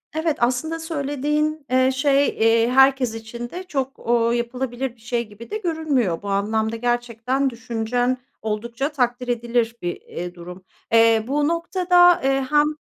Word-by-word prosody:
Evet, 315 -1 0
aslında 255 +7 0
söylediğin, 300 -1 -2
eee, 260 0 +4
şey, 280 +1 +2
eee, 225 +1 +2
herkes 265 -2 +4
için 235 +2 -7
de 360 +6 -7
çok, 270 -6 -4
ooo, 235 0 +1
yapılabilir 245 +1 -3
bir 230 - -25
şey 235 0 -2
gibi 210 +2 -13
de 425 - -2
görünmüyor. 310 - -1
Bu 205 - -6
anlamda 220 +3 0
gerçekten 240 +3 -1
düşüncen 240 +1 -1 0.2
oldukça 235 +6 -3
takdir 250 -3 -1
edilir 235 -1 0
bir, 175 0 -4
eee, 175 +1 -7
durum. 180 +1 -10 0.3
Eee, 225 -1 +5
bu 290 +2 +1
noktada, 355 +1 +4
eee, 270 0 +1
hem, 295 0 +4
245 Hz, 150 wpm, -22 LUFS, 230-285 Hz, 0.3 s, Eee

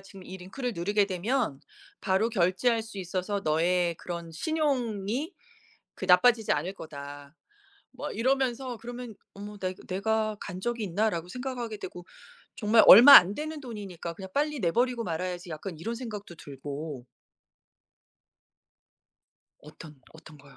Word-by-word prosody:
지금 195 -1 -14
이 190 - -8
링크를 235 +7 -5
누르게 200 +4 +1
되면 200 - -1 0.4
바로 195 +3 +1
결제할 220 +3 +1
수 220 -3 -10
있어서 185 +2 -3
너의 170 +2 +1
그런 170 -1 -7
신용이 260 - -1 0.6
그 - - -7
나빠지지 220 +5 +5
않을 185 - -1
거다." 145 -2 -10 0.6
뭐 - - -6
이러면서 255 0 0
그러면 240 0 -8 0.2
'어머 205 +1 -9
나 185 -1 -2
이 - - -8
내가 215 +3 -1
간 185 -1 -7
적이 240 0 -2
있나?'라고 180 -2 -1
생각하게 245 -2 -5
되고 180 -2 -8 0.5
정말 220 +1 +4
얼마 250 +8 +11
안 190 -1 +9
되는 310 0 -5
돈이니까 195 - -7
'그냥 190 +1 -9
빨리 295 -1 0
내 170 - +1
버리고 245 -1 0
말아야지.' 175 +1 -4
약간 165 +3 -6
이런 230 +7 -4
생각도 210 -7 -7
들고 140 -1 -7 2.5
어떤 150 -1 -13
어떤 155 -1 -14
거요? 140 -1 -18
200 Hz, 295 characters per minute, -28 LUFS, 175-235 Hz, 2.5 s, 얼마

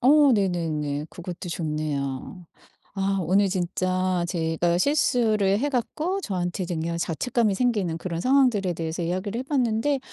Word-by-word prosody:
어 285 +1 +6
네네네. 160 -7 -1
그것도 175 0 -7
좋네요. 150 0 -3 0.5
아 195 0 0
오늘 195 +4 +3
진짜 185 0 0
제가 170 0 0
실수를 220 -7 +2
해 290 +4 0
갖고 315 - -1
저한테 185 - -2
이제 175 0 -3
그냥 170 +1 -2
자책감이 215 +6 0
생기는 205 -9 0
그런 170 -1 -4
상황들에 250 -8 +3
대해서 165 +1 -3
이야기를 185 +6 -2
해 - - -2
봤는데 265 0 +1
185 Hz, 320 characters per minute, -25 LUFS, 170-235 Hz, 0.5 s, 어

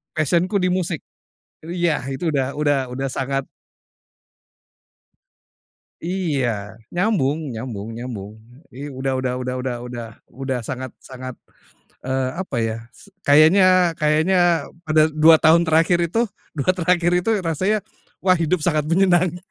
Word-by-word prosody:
Passion-ku 170 +6 +1
di 180 -1 +1
musik. 180 -3 -1 0.6
Jadi 170 +3 -7
ya, 170 -3 +2
itu 155 +4 -2
udah 135 0 -1
udah 145 -2 +2
udah 135 +2 -3
sangat 135 +1 -2 2.6
Iya, 135 - -2 0.2
nyambung 160 - 0
nyambung 115 -2 -6
nyambung. 115 -4 -7 0.4
I 140 +4 -7
udah 135 -1 -3
udah 130 -1 -1
udah 125 0 -3
udah 125 -1 -3
udah 120 -1 -6 0.3
udah 135 0 -3
sangat 130 +1 -6
sangat, 130 -1 -8 0.6
eee, 130 0 -1
apa 190 -8 -4
ya, 110 -1 -1 0.2
se 200 - -17 0.2
kayaknya 155 +7 +6 0.4
kayaknya, 165 +2 +3 0.2
pada 155 0 +4
2 155 +1 +6
tahun 165 +2 +5
terakhir 165 +2 +3
itu, 200 +8 -1 0.4
2 150 +4 +2
terakhir 175 0 +2
itu 180 - -2
rasanya, 185 +6 0 0.5
wah 185 -1 +4
hidup 170 +2 +1
sangat 150 -3 +1
menyenangkan. 175 0 +2
150 Hz, 130 wpm, -21 LUFS, 130-175 Hz, 2.6 s, kayaknya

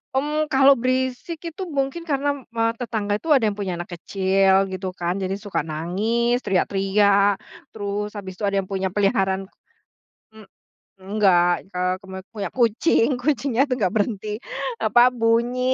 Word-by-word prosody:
Hmm, 300 +3 0
kalau 270 +1 +6
berisik 255 +5 -2
itu 330 - -10 0.2
mungkin 275 +5 -1
karena 285 -2 0 0.3
me 230 - 0 0.2
tetangga 220 -4 -2
itu 315 +7 +1
ada 235 -6 +3
yang 205 - -6
punya 195 -3 -3
anak 175 0 -6
kecil, 195 +1 +2
gitu 185 0 -5
kan, 175 +1 -2
jadi 190 -1 -2
suka 200 -7 -3
nangis, 210 +10 0
teriak-teriak, 200 +1 +2 0.3
terus 210 0 -4
habis 190 -3 -8
itu 205 - -2
ada 200 -1 +1
yang 185 - -12
punya 190 -2 -2
peliharaan 195 -1 +1 0.9
hmm. 215 -2 -14 0.6
Enggak, 185 -3 +2
eee, 180 0 +1
keme 190 -1 -9
punya 205 -4 -4
kucing, 235 +1 +3
kucingnya 265 -2 0
tuh 255 - 0
nggak 185 -4 +1
berhenti 210 0 -1 0.4
apa, 240 - +4 0.2
bunyi 230 +2 +2
205 Hz, 150 wpm, -22 LUFS, 190-240 Hz, 0.9 s, kalau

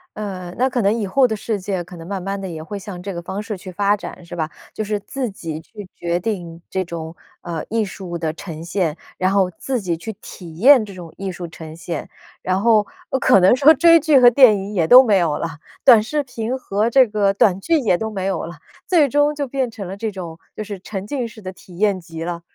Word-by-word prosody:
呃， 190 -4 -6
那 255 +2 +2
可 245 -1 -1
能 200 0 +3
以 220 -3 -2
后 255 +7 +4
的 220 - -2
世 215 0 -3
界 190 -1 -2
可 180 - -12
能 165 -1 -10
慢 195 -1 -4
慢 195 +2 -3
地 190 - -5
也 160 -2 -6
会 200 +6 -6
向 195 -2 -8
这 195 +1 -5
个 170 - -5
方 190 +4 -5
式 210 -1 -5
去 185 +1 -9
发 200 +3 +2
展， 190 -3 -9
是 170 - -8
吧？ 160 -2 -2 0.2
就 215 - -3
是 210 0 -2
自 245 +5 -4
己 160 -5 -6
去 205 +3 -11
决 170 0 -1
定 175 -4 -4
这 190 - -1
种， 165 -2 -7 0.3
呃， 165 -3 -5
艺 225 0 0
术 185 -3 -6
的 160 -2 -2
呈 165 -1 -8
现， 170 -3 -1 0.2
然 185 +1 +1
后 195 -2 +3
自 260 -2 -2
己 180 -5 -2
去 170 +7 -6
体 165 -4 -11
验 255 +4 +7
这 205 -2 -9
种 175 -3 -10
艺 195 -1 -4
术 175 -1 -7
呈 160 -1 -10
现。 170 +1 -6 0.3
然 185 +1 0
后 220 -2 +4 0.4
可 - - +6
能 185 +6 +5
说 285 +4 +7
追 335 +3 +6
剧 305 -3 +4
和 245 -1 +8
电 245 -3 +6
影 195 +2 -6
也 175 -5 +2
都 250 +6 +10
没 215 -6 +3
有 165 -4 0
了， - - -2 0.4
短 235 -5 +8
视 295 +7 -1
频 245 -1 -4
和 215 -3 -1
这 260 +1 +5
个 205 -2 +1
短 195 -1 +3
剧 325 +9 +2
也 215 -9 +2
都 220 +3 -3
没 190 -3 -4
有 190 -3 -1
了， 170 +1 -8 0.3
最 330 -6 +4
终 290 +2 +2
就 290 -2 -3
变 260 -2 -2
成 210 -4 -7
了 190 - -6
这 220 +2 -3
种 175 -4 -7 0.2
就 215 - -4
是 205 -2 -7
沉 195 +1 -6
浸 260 0 -2
式 225 -1 -13
的 185 -1 -7
体 180 -1 -15
验 200 -1 +2
集 165 -1 -8
了。 170 -1 -4
195 Hz, 265 characters per minute, -20 LUFS, 175-225 Hz, 0.4 s, 都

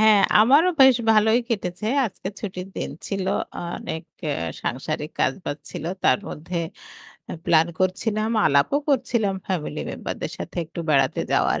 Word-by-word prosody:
হ্যাঁ 215 -2 +6 0.2
আমারও 285 +11 +6
বেশ 265 -2 +8 0.2
ভালোই 220 +2 +4
কেটেছে। 200 -3 -3 0.2
আজকে 190 - -7
ছুটির 190 -2 -6
দিন - - -3 0.2
ছিল। 195 -2 -2 0.5
অনেক 160 - -5 0.2
এ্যা 145 - 0 0.3
সাংসারিক 150 +3 -3
কাজ-বাজ 145 +1 -1
ছিল। 155 - -6 0.2
তার - - +5
মধ্যে 170 +3 -5 0.7
এ্যা - - -6
প্লান 165 0 +4
করছিলাম, 215 +4 0 0.2
আলাপও 140 - +3
করছিলাম 235 -7 +1
ফ্যামিলি 180 -6 -2
মেম্বার - - -5
দের - - -3
সাথে - - -7
একটু 165 +2 -7
বেড়াতে 135 -3 +3
যাওয়ার। - - +2
190 Hz, 145 wpm, -23 LUFS, 160-220 Hz, 0.7 s, বেশ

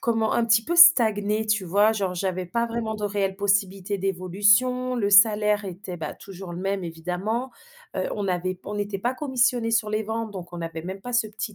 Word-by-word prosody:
comment 225 -3 0
un 235 - +1
petit 225 0 +3
peu 345 - -2
stagner, 220 -10 +5
tu 210 -3 0
vois? 205 +5 +3
Genre, 195 -4 -2
j'avais 185 0 -3
pas 235 +6 -1
vraiment 230 -1 -3
de 210 -1 -5
réelle 200 -2 -1
possibilité 200 -1 0
d'évolution, 205 +7 +1
le 205 -4 0
salaire 210 0 +4
était, 185 -1 -7
bah, 155 -2 -6
toujours 190 -2 -10
le 175 - -6
même 195 -1 -2
évidemment, 180 +9 -4 0.5
heu, - - -1
on 200 -2 -3
avait 185 +1 -1
p 185 - -23
on 210 - -6
n'était 205 -1 -3
pas 245 +6 -2
commissionné 250 -4 0
sur 220 -1 +1
les 215 +1 -1
ventes 220 +1 -4
donc 180 -3 -9
on 175 - -7
avait 165 -1 -6
même 190 +3 -7
pas 245 - -7
ce 240 -2 +2
petit 215 0 -6
205 Hz, 215 wpm, -24 LUFS, 190-225 Hz, 0.5 s, stagner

